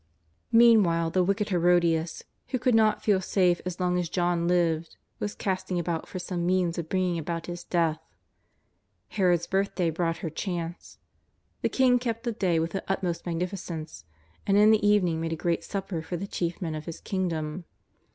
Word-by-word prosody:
Meanwhile 200 -9 +5
the 185 +1 +2
wicked 200 +3 0
Herodias, 170 -2 +2 0.2
who 260 - -1
could 250 0 +1
not 220 -1 +3
feel 200 -3 +3
safe 180 -2 +2
so 180 - -3
long 180 0 +1
as 175 -2 -2
John 175 -1 0
lived, 170 -2 +1 0.2
was 205 - -3
casting 185 -1 -2
about 170 -1 -2
for - - -7
some 180 -1 -3
means 175 -1 +1
of 160 -1 -5
bringing 185 -2 0
about 165 +1 -4
his 175 0 -6
death. 165 -3 0 1.1
Herod's 175 -4 +2
birthday 190 -3 0
brought 165 0 -1
her 160 - -3
chance. 170 -1 -5 0.6
The - - +1
king 255 -2 +3
kept 230 -2 -3
the 240 - -1
day 185 -6 0
with 165 +1 0
the 195 - -3
utmost 180 -3 -2
magnificence, 170 - -4 0.4
and 200 0 +4
in 210 +1 +7
the 215 -1 +3
evening 185 -6 +3
made 165 0 -2
a - - -1
great 170 +1 -1
supper 195 -4 -4
for 175 +2 -5
the 195 - -4
chief 175 -2 -3
men 160 -2 -2
of 155 0 -6
his 165 - -7
kingdom. 170 -3 -3
175 Hz, 180 wpm, -27 LUFS, 165-195 Hz, 1.1 s, in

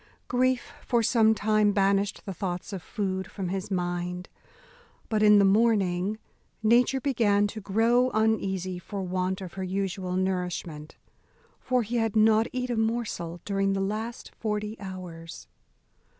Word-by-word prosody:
Grief 255 0 0
for 235 -2 +1
some 220 -1 +4
time 215 -1 +2
banished 200 0 +1
the 195 - -4
thoughts 180 +2 -4
of 190 - -4
food 190 0 -3
from 195 -4 -4
his 190 +1 -3
mind; 180 -1 -3 0.8
but 215 -2 +1
in 210 -1 +7
the 200 - +5
morning 200 -2 +2 0.5
nature 245 +4 +4
began 225 -7 +2
to 215 +1 -5
grow 230 +5 +3
uneasy 195 -5 0
for 195 +2 -5
want 185 +1 -2
of 185 -2 -7
her 190 - -5
usual 185 -1 -2
nourishment: 180 -5 -3 0.6
for 255 -2 +1
he 235 +3 -2
had 225 -2 0
not 220 +1 +4
eat 250 -1 -2
a 235 - -1
morsel 220 -7 -2
during 195 -1 +1
the 195 - -1
last 215 +4 -4
forty 210 -1 -3
hours. 180 -4 -8
200 Hz, 145 wpm, -27 LUFS, 185-220 Hz, 0.8 s, in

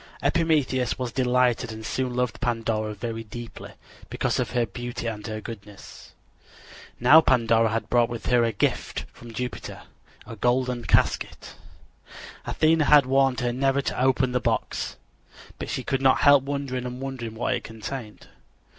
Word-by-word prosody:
Epimetheus 145 -7 +1
was 125 -2 -3
delighted 125 -1 +1
and 110 0 -8
soon 125 +1 -2
loved 125 -3 -1
Pandora 115 -2 -1
very 115 +1 -5
deeply, 115 +2 -9 0.4
because - - -1
of - - -1
her 120 -2 +1
beauty 120 +4 -6
and 110 -2 -4
her 110 -1 -4
goodness. 105 -3 -11 0.9
Now 145 +7 +8
Pandora 115 -5 +3
had 110 -1 -2
brought 120 0 +3
with 120 -1 -6
her 120 -1 +3
as 115 - +2
a - - -5
gift 100 - -1
from 120 -1 -12
Jupiter 125 +2 -6 0.4
a 115 - -8
golden 120 +1 0
casket. 85 - 0 0.9
Athena 160 -1 +2
had 145 -2 +6
warned 135 -1 +2
her 120 -1 0
never 135 +2 +1
to - - -2
open 130 0 +2
the 125 - +1
box, - - -2 0.6
but - - -5
she - - -3
could 135 -1 -1
not 135 -1 +4
help 145 -2 +6
wondering 140 -3 -3
and 125 0 -7
wondering 130 -4 -5
what 120 +3 -1
it 120 - -3
contained. 110 0 -7
125 Hz, 160 wpm, -25 LUFS, 115-130 Hz, 0.9 s, Now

